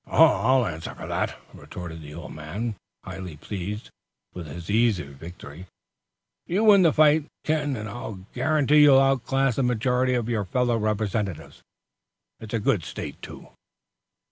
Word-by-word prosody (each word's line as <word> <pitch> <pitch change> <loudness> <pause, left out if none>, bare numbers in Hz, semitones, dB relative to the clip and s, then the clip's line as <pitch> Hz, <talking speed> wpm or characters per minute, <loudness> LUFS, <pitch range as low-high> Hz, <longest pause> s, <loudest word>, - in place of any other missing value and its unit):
"I'll 130 +3 +4
answer 80 -4 -5
for - - -8
that," - - -2
retorted 85 -2 -9
the 75 0 -10
old 85 - -8
man, 95 +10 -4 0.3
highly 90 -5 -8
pleased 100 +5 -6 0.4
with 85 -3 -7
his 85 +3 -8
easy 110 -3 +2
victory. 80 +4 -11 0.8
"You 190 +6 +1
win 205 -3 +7
the 165 -3 +5
fight, 155 0 +4 0.2
Ken, 150 -3 0
and 110 -2 -5
I'll 105 -4 -7
guarantee 150 -1 +3
you'll 140 -2 +7
outclass 135 -1 +1
the - - +2
majority 125 +1 +1
of 120 -2 -1
your 110 -4 -1
fellow 120 +5 +1
Representatives. 105 -5 -2 0.8
It's 110 +1 -6
a - - +1
good 105 - +1
state, - - -7
too." - - -10
110 Hz, 145 wpm, -25 LUFS, 90-135 Hz, 0.8 s, win